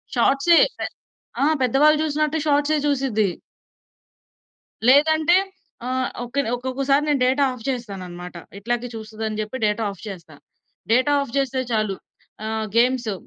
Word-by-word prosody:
షార్ట్‌సే, 280 +5 +4 0.2
పె - - -3 0.6
ఆ! - - +4 0.2
పెద్దవాళ్ళు 285 +5 +4
జూసినట్టు 305 0 0
షార్ట్‌సే 295 +1 +2
జూసిద్ది. 255 -8 +1 1.6
లేదంటే, 315 +5 +5 0.5
ఆహ్, 255 0 -1 0.2
ఒక్కనే 270 +1 -2
ఒక్కొక్కసారి 270 +3 0
నేను 290 -2 +2
డేటా 265 +3 +2
ఆఫ్ 245 -3 -11
చేస్తానన్నమాట. 185 -8 -6 0.2
ఇట్లాగే 240 +3 -2
చూస్తదని 220 0 -5
జెప్పి, 215 +5 -5
డేటా 210 +2 0
ఆఫ్ 195 - -13
చేస్తా. 170 -6 -9 0.6
డేటా 260 +5 +3
ఆఫ్ 245 - -11
జేస్తే 270 -1 0
చాలు 215 -3 0 0.5
ఆహ్, 220 0 -2
గేమ్సు 240 -2 +2
255 Hz, 120 wpm, -22 LUFS, 220-280 Hz, 1.6 s, లేదంటే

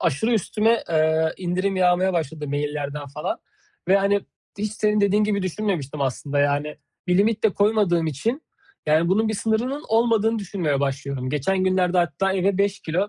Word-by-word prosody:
Aşırı 170 - 0
üstüme, 225 +2 +1
eee, 160 0 +2
indirim 185 +2 -1
yağmaya 185 +1 +3
başladı 155 -3 -3
maillerden 145 0 -3
falan. 145 +2 -4 0.5
Ve, 195 - +6
hani, 200 +1 +2 0.4
hiç 210 0 -2
senin 210 -1 +1
dediğin 205 +1 +3
gibi 200 -2 0
düşünmemiştim 180 -7 -3
aslında. 140 +2 -2
Yani, 145 +1 0 0.3
bir 180 +1 +2
limit 215 +2 +1
de 220 - +5
koymadığım 200 -5 +2
için, 225 - -2 0.4
yani, 160 +3 +3
bunun 215 +4 +2
bir 220 - -1
sınırının 240 +8 -1
olmadığını 225 0 +2
düşünmeye 175 -8 -2
başlıyorum. 135 -2 -3
Geçen 185 +7 0
günlerde 185 -1 +2
hatta 175 +3 +1
eve 190 +1 +1
5 200 0 +1
kilo 180 +6 -1
185 Hz, 160 wpm, -23 LUFS, 150-210 Hz, 0.5 s, Ve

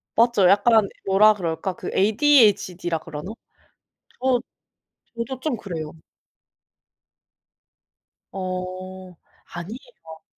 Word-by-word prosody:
맞죠. 230 -5 +4
약간 210 +2 +4 0.2
뭐라 205 +3 +5
그럴까? 180 -1 -3
그 - - -6
ADHD라 205 - +3
그러나? 160 +4 -7 0.9
저 255 -1 +2 0.8
저도 235 +2 -4
좀 265 -3 -2
그래요. 165 -7 -6 2.4
어. 185 0 -6 0.4
아니에요. 175 - -10
195 Hz, 175 characters per minute, -23 LUFS, 180-230 Hz, 2.4 s, 뭐라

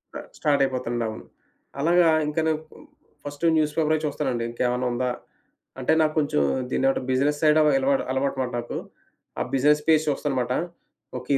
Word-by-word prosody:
ఆహ్, - - -7
స్టార్ట్ 145 -2 +1
అయిపోతా 130 -2 -2
అండి 120 -1 -1
అవును. 110 - -7 0.6
అలాగా 170 +3 +4 0.2
ఇంకను 160 +1 0 0.7
ఫస్ట్ 145 +3 -5
న్యూస్ 150 -1 +1
పేపరైతే 155 -1 +1
చూస్తానండి. 135 -5 -2
ఇంకేమన్నా 125 +1 -1
ఉందా? 125 +1 -1 0.7
అంటే 130 +5 +1
నాకు 155 -1 +1
కొంచెం 145 - +1 0.3
దీన్ని 135 - +1
ఒకటి 135 - -4
బిజినెస్ 145 +3 +1
సైడ్ 155 0 +5
ఆహ్, 150 -1 +4
ఎలవాటు 135 0 +1
అలవాటనమాట 130 -1 -1
నాకు, 120 - -5 0.6
ఆ - - +1
బిజినెస్ 150 +3 +3
పేజ్ 155 -1 +4
చూస్తానమాట. 130 -3 -1 0.7
ఓకే. 125 +3 -7
140 Hz, 155 wpm, -24 LUFS, 125-150 Hz, 0.7 s, సైడ్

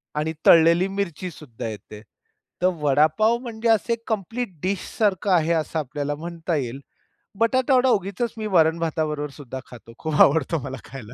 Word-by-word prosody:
आणि 155 +2 -1
तळलेली 170 +3 +6
मिरची 185 -2 -3
सुद्धा 125 -6 -8
येते. 105 0 -9 0.6
तर 180 - +4
वडापाव 155 +11 +3
म्हणजे 235 -2 -3
असं 225 +1 +3
एक 230 0 -6
कंप्लीट 225 +3 -2
डिशसारखं 195 +1 -1
आहे 170 -2 +3
असं 160 0 -1
आपल्याला 145 0 -3
म्हणता 170 +2 -4
येईल. 135 -2 -3 0.6
बटाटावडा 255 +2 +3
उगीचच 200 +2 0
मी 215 -1 -3
वरण-भाताबरोबर 160 -2 +1
सुद्धा 135 -2 -8
खातो. 115 -1 -13
खूप 155 -1 +1
आवडतो 160 +2 +4
मला 130 - -5
खायला. 120 -1 -10
165 Hz, 145 wpm, -23 LUFS, 145-205 Hz, 0.6 s, तळलेली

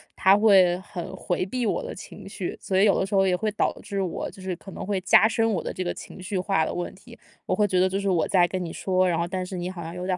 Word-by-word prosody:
他 190 +1 +5
会 195 -5 +5
很 190 -1 -7
回 180 -1 -2
避 245 +2 -2
我 - - -1
的 - - -6
情 - - -11
绪。 - - -5
所 190 -1 0
以 - - +6
有 200 - +3
的 190 - +1
时 200 - -8
候 195 -1 +4
也 180 - +2
会 215 +1 -1
导 205 - +1
致 200 -2 -3
我 180 -3 -3
就 190 - -14
是 185 -1 -3
可 195 +2 -12
能 - - -7
会 195 -1 -1
加 200 +3 +6
深 225 -1 +1
我 180 - -1
的 - - -4
这 185 - -4
个 175 - -2
情 - - -11
绪 190 0 -3
化 185 -4 +1
的 - - -3
问 175 - -3
题， 235 +4 -15 0.3
我 - - -1
会 210 -1 +2
觉 185 -1 +1
得 185 - +4
就 195 +1 -2
是 200 0 -1
我 175 -3 +2
在 175 -2 +4
跟 185 0 -3
你 165 - -6
说， 185 -1 +1
然 170 -2 +1
后 170 - 0
但 185 0 -3
是 185 - -7
你 175 0 -3
好 175 -3 -7
像 165 +1 -7
有 180 +1 -5
点 185 -1 0
190 Hz, 335 characters per minute, -25 LUFS, 180-200 Hz, 0.3 s, 以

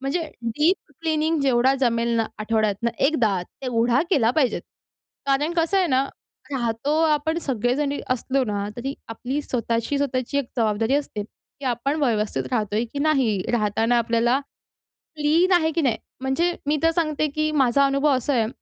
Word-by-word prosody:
म्हणजे 275 +6 -1 0.2
deep 300 - 0
cleaning 315 -1 0
जेवढा 260 0 +3
जमेल 235 -2 +1
ना 225 - +1
आठवड्यातनं 215 +1 0 0.2
एकदा, 220 - +1
तेवढा 240 +3 0
केला 240 -9 +4
पाहिजेत. 265 -2 +1 0.6
कारण 280 +4 +1
कसं 330 +4 +2
आहे 370 - +3
ना, 265 -2 +2 0.5
राहतो 240 +2 -1
आपण 315 +1 +1
सगळेजण 265 0 0 0.2
असलो 260 +2 0
ना, 205 -2 -2
तरी 270 +3 -4
आपली 245 +5 -3
स्वतःची-स्वतःची 255 +3 -1
एक 280 - 0
जबाबदारी 225 +2 +1
असते, 280 -8 -2
की 275 +6 -16
आपण 250 +4 0
व्यवस्थित 215 -5 0
राहतोय 215 -1 0
की 285 - -4
नाही? 265 -10 +2
राहताना 225 +1 +2
आपल्याला 235 +2 +2 0.8
क्लीन 315 +5 +2
आहे 320 -2 +3
की 335 - +2
नाही? 240 -6 +1 0.2
म्हणजे 270 +7 +1 0.2
मी 300 - +2
तर 330 - +5
सांगते 310 -2 +1
की 310 0 +1
माझा 275 -1 +3
अनुभव 275 +2 +2
असा 270 +3 -1
आहे 225 -4 +2
265 Hz, 150 wpm, -23 LUFS, 230-295 Hz, 0.8 s, तर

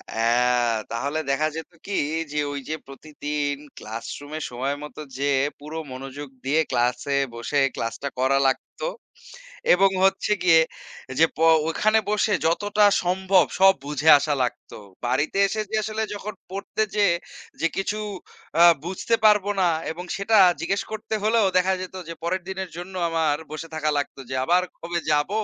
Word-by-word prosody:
হ্যাঁ, 120 +1 +2 0.2
তাহলে 140 +7 -2
দেখা 150 +3 +1
যেত 160 +1 -7
কি - - -7 0.4
যে, 150 - -4
ওই 140 - -4
যে 155 - -1
প্রতিদিন 145 +1 -4 0.2
class 110 +2 -7
room-এ 145 +2 -7
সময়মতো 140 +5 -4 0.2
যেয়ে 140 -1 +2 0.2
পুরো 150 +2 -7
মনোযোগ 135 +3 -7 0.2
দিয়ে 145 +4 +2
class-এ 125 +3 +1 0.2
বসে 120 +5 -1 0.2
class-টা 115 +5 -3
করা 135 +1 +3
লাগত 130 - 0 1.1
এবং 195 +2 +5 0.2
হচ্ছে 195 +2 +1
গিয়ে 165 -3 +6 0.6
যে, 165 - +8
প - - -12 0.3
ওখানে 215 +6 +3
বসে 210 0 +2
যতটা 205 +5 +1 0.2
সম্ভব 185 0 +3
সব 195 0 +7
বুঝে 150 +2 +1
আসা 145 +1 0
লাগত। 125 - -4 0.3
বাড়িতে 145 +9 0
এসে 215 +2 -2
যে - - 0
আসলে 215 +1 -3
যখন 210 +1 -6 0.2
পড়তে 200 +2 -2
যেয়ে 200 -5 +4 0.5
যে, 165 - +4
কিছু 195 +2 -1 0.9
বুঝতে 190 +5 -3
আ - - -31
পারব 210 -2 +6 0.2
না - - +4 0.3
এবং 175 +3 -7
সেটা 205 +3 +2 0.2
জিজ্ঞেস 195 +4 0
করতে 220 0 -5
হলেও 220 0 +3
দেখা 185 +1 +3
যেত 185 0 -7
যে - - -4
পরের 185 +2 -1
দিনের 190 -1 -4
জন্য 180 +2 -7 0.2
আমার 160 -3 +1
বসে 155 +2 -6
থাকা 155 -1 0
লাগত 145 - -3
যে, 130 - -3
আবার 180 +3 +3 0.2
কবে 170 +1 -3
যাব? 145 +1 +2
160 Hz, 155 wpm, -24 LUFS, 140-190 Hz, 1.1 s, যে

